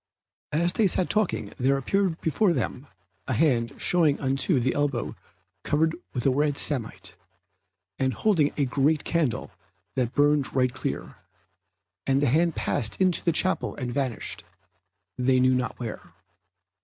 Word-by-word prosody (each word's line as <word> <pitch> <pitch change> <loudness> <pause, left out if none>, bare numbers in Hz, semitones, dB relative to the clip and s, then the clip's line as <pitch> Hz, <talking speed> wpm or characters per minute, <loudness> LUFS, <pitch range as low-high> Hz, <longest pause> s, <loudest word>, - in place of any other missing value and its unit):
As 170 +3 +1
they 220 - +3
sat 185 0 +1
talking 215 -3 -1
there 135 +1 +2
appeared 180 +5 0
before 175 +4 +2
them 130 0 -3 0.4
a 130 - 0
hand 115 -3 +1
showing 160 -5 +2
unto 135 +3 +1
the 130 +1 0
elbow 145 -4 -1 0.5
covered 160 +2 +1 0.2
with 125 - -4
red 145 +2 +2
samite, 130 -7 -1 0.8
and 130 0 +1
holding 165 -9 +2
a 145 - +2
great 145 +4 +1
candle 160 -8 -1 0.4
that 125 -2 -2
burned 145 -1 +2
right 130 -2 +2
clear; 130 - -5 0.9
and 135 0 +3
the 145 - +2
hand 160 +5 +2
passed 110 -2 -1
into 185 -2 +2
the 170 - +2
chapel 185 +3 +1
and 125 -3 -4
vanished, 130 -4 -3 0.8
they 130 +1 +3
knew 130 0 +4
not 125 0 -2
where. 110 -7 -7
140 Hz, 145 wpm, -26 LUFS, 130-160 Hz, 0.9 s, knew